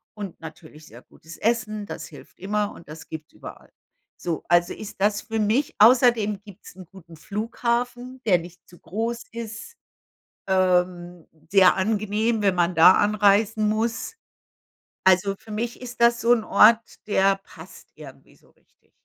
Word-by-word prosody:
und 200 -4 -8
natürlich 155 -1 -13
sehr - - -15
gutes 160 +1 -15
Essen. 215 -2 -1
Das 165 -4 -8
hilft - - -16
immer 205 +2 -2
und 165 - -15
das 155 +1 -11
gibt's 160 -1 -9
überall. - - -13 0.5
So, 170 -2 -4
also 175 0 +2
ist 210 -2 -10
das 205 +1 +1
für 225 -2 -5
mich 225 +7 0
außerdem 225 -3 +4
gibt's 190 -4 -15
'n 185 -1 -12
guten 170 -4 -15
Flughafen, 240 +6 -4
der 180 -5 +3
nicht 175 +1 -14
zu 175 - -18
groß 225 +7 -4
ist. 230 - -8 0.7
Ähm, 180 -2 0 0.2
sehr 195 -2 +5
angenehm, 215 +2 -1
wenn 195 -2 +2
man 175 0 +1
da 170 +3 +7
anreisen 210 +1 +2
muss. 225 - -2 0.9
Also 190 +1 +3
für 220 - -17
mich 230 +3 -4
ist 245 -1 -9
das 235 0 +3
so 235 +1 +4
'n 230 -2 +2
Ort, 225 +2 +3
der 195 -1 +2
passt 195 - -15
irgendwie - - -14
so - - -27
richtig. - - -38
205 Hz, 155 wpm, -23 LUFS, 180-225 Hz, 0.9 s, da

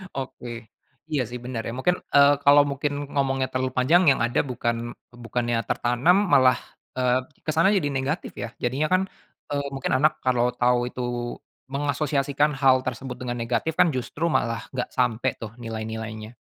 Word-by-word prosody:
Oke, 130 -2 -6 0.6
iya 145 -3 +1
sih 125 0 -6
benar 125 -2 -3
ya - - -3
mungkin, 180 +7 +2 0.2
eee, 140 0 +8
kalau 145 +1 +7
mungkin 140 +1 -2 0.2
ngomongnya 135 -2 +1
terlalu 130 0 -1
panjang 150 +8 +5
yang - - +1
ada 120 - 0
bukan 120 -1 -1 0.5
bukannya 120 +1 -1
tertanam 125 +10 +3 0.2
malah, 130 -2 +6 0.4
eee, 125 -1 +3 0.3
ke 155 - 0
sana 165 +3 +4
jadi 145 -6 0
negatif 140 +6 -2
ya - - -3 0.2
jadinya 130 +5 +1
kan, 185 - +4 0.5
eee, 140 0 -1
mungkin 135 0 -3
anak 150 +3 +4
kalau 125 -2 +3
tahu 125 0 +3
itu, 125 - -6 0.7
mengasosiasikan 145 0 0
hal 130 -1 +5
tersebut 130 0 -5
dengan 120 -1 -4
negatif 115 +7 -1
kan - - +7
justru 145 +6 -2
malah 115 -7 -1
nggak 125 - -2
sampai 125 0 +1
tuh 115 -1 -8
nilai-nilainya. 110 -1 -6
130 Hz, 160 wpm, -25 LUFS, 120-140 Hz, 0.7 s, eee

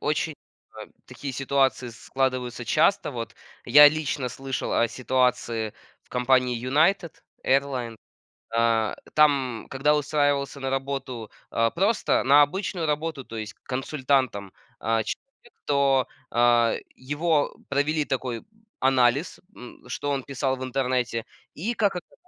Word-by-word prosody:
очень, 155 +1 -1 0.4
а, - - -9 0.2
такие 140 -2 -7
ситуации 135 -1 +1
складываются 125 +1 -2
часто, 160 - +2
вот. 115 -4 -6 0.3
Я 150 +4 +9
лично 145 -4 -2
слышал 135 +1 -4
о 115 - +3
ситуации 125 -3 0 0.3
в - - -33
компании 125 -1 +2
United 160 +8 +2 0.3
Airline. 130 -4 0 0.5
А, 115 -1 +1 0.2
там, 135 -7 +3
когда 140 +3 +2
устраивался 145 -1 0
на 135 0 -2
работу, 135 -4 -4 0.2
а, 115 0 +2
просто, 200 - +1
на 140 +2 +7
обычную 175 +2 -1
работу, 150 -2 -2
то 115 - -8
есть 105 -1 -5
консультантом. 130 -6 -1 0.3
А, 115 +1 0
человек, 255 - -9
то, 140 -2 +3 0.2
а, 120 -1 +3 0.2
его 145 +3 0
провели 150 +2 +1
такой 125 -3 -3 0.4
анализ: 130 +3 +2 0.2
м, 125 - -12
что 145 +3 -3
он 140 -1 -1
писал 135 -1 -1
в 130 - -6
интернете? 125 -3 -1 0.3
И, 215 +10 -3
как 205 -5 +1
оказзалось, 175 - -9
135 Hz, 125 wpm, -25 LUFS, 125-145 Hz, 0.5 s, Я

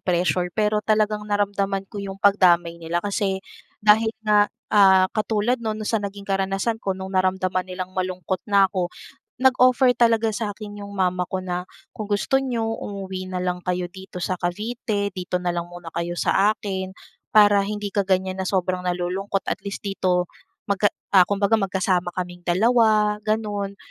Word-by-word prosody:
pressure 180 0 +1
pero 210 0 +2
talagang 215 0 +1
naramdaman 200 -1 0
ko 205 +1 -8
'yong 195 -1 -6
pagdamay 175 -4 +3
nila. 170 +3 -2
Kasi 195 -1 -1 0.4
dahil 220 +1 +5 0.2
nga, 210 -1 +4 0.2
ah, 190 -2 +6
katulad 220 +3 0
no'n, 220 -2 -2
no'n 215 - -5
sa 225 0 0
naging 200 0 -6
karanasan 195 +3 -1
ko 190 -1 -2
nung 190 0 -7
naramdaman 185 0 0
nilang 185 0 -5
malungkot 185 0 -3
na 200 -1 +5
ako, 180 -2 -1 0.5
nag-offer 255 0 +4
talaga 230 -2 +2
sakin 205 -1 -5
'yong 200 0 -8
mama 180 -1 0
ko 185 -1 -3
na, 180 0 -4 0.2
"Kung 215 -1 -6
gusto 210 +6 +1
ninyo, 240 -4 -2
umuwi 190 -3 -6
nalang 180 0 -2
kayo 180 0 -1
dito 190 -1 -11
sa 185 0 -2
Cavite, 205 +2 -2
dito 180 0 -3
na 180 -1 -1
lang 170 0 -4
muna 175 -2 -10
kayo 170 +1 -3
sa 205 +4 +3
akin, 190 -2 -4 0.4
para 205 -1 +6
hindi 205 -1 -4
ka 205 - +1
ganyan 190 0 0
na 185 - -2
sobrang 185 -1 0
nalulungkot 180 +3 -2
at - - -3
least 200 +1 -7
dito 185 -2 0 0.4
magka" 200 0 +2 0.3
ah, 185 - +9
kumbaga 205 +2 +2
magkasama 185 -2 0
kaming 175 -1 -4
dalawa 215 +1 +3
gano'n. 205 -2 -2
195 Hz, 165 wpm, -23 LUFS, 185-210 Hz, 0.5 s, ah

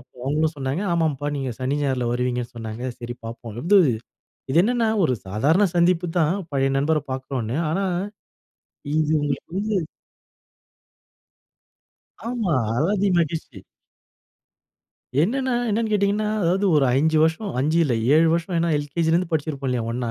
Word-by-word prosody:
அப்போ 125 - -23
அவங்களும் 155 +3 0
சொன்னாங்க 140 +7 -2
ஆமாம்ப்பா 155 -4 0
நீங்க 135 -2 -3
சனி, 130 +3 0
ஞாயிறுல 130 -3 0
வருவீங்கன்னு 125 -1 -2
சொன்னாங்க 115 +2 -6
சரி 120 0 -6
பார்ப்போம். 115 -1 -8 0.9
இது 160 - +3
என்னன்னா 235 +1 +1
ஒரு 140 -7 +2
சாதாரண 140 - +2
சந்திப்பு 175 0 +3
தான் 160 +2 +2 0.2
பழைய 135 -1 +1
நண்பர 155 +3 +2
பார்க்குறோன்னு. 130 -2 -3
ஆனா 195 +4 0 1.1
இது 155 -1 +1
உங்களுக்கு 140 0 -3
வந்து 210 +1 -1 2.5
ஆமா. 225 -9 0 0.2
அலாதி 195 +8 +1
மகிழ்ச்சி. 155 -8 -2 1.6
என்னென்ன 260 +7 0 0.2
என்னென்னு 220 +1 0
கேட்டிங்கன்னா? 205 +1 +1
அதாவது 185 +4 +1
ஒரு 140 - +4
5 155 +5 +2
வருஷம் 160 +6 0
அஞ்சு 155 +4 +1
இல்ல 130 - +1 0.2
7 160 +2 +5
வருஷம். 170 +2 -1
ஏனா 170 - +1
எல்கேஜிலேருந்து 165 +4 0
படிச்சிருப்போம் 145 -3 -2
இல்லையா 120 -3 -1
ஒண்ணா. 120 -1 -2
155 Hz, 130 wpm, -23 LUFS, 130-180 Hz, 2.5 s, 7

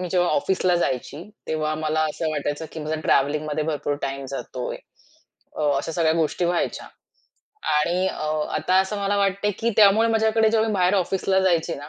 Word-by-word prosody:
मी 180 - -3
जेव्हा 180 -1 +2
ऑफिसला 190 -9 +1
जायची, 145 0 -2 0.3
तेव्हा 155 -1 -1
मला 155 0 -1
असं 160 +1 -3
वाटायचं, 145 +1 -3
की 160 - -6
माझा 155 +1 -3
ट्रॅव्हलिंगमध्ये 150 +2 +1
भरपूर 150 -2 -2
टाईम 135 0 -3
जातोय. 130 -2 -5 0.8
अ, - - -3 0.2
अशा 165 - -4
सगळ्या 160 -1 +2
गोष्टी 165 +2 0
व्हायच्या 175 0 -1 0.9
आणि 175 +5 +1
अ, 155 - -5 0.3
आता 185 - 0
असं 190 +2 -3
मला 200 +1 +1
वाटतंय 200 +1 +1
की 235 - +1
त्यामुळे 215 +2 +6
माझ्याकडे 220 0 +3
जेव्हा 225 0 +2
मी 215 - -1
बाहेर 185 0 +2
ऑफिसला 190 0 +1
जायची 170 -3 +1
ना, 145 +1 -9
170 Hz, 170 wpm, -23 LUFS, 155-195 Hz, 0.9 s, त्यामुळे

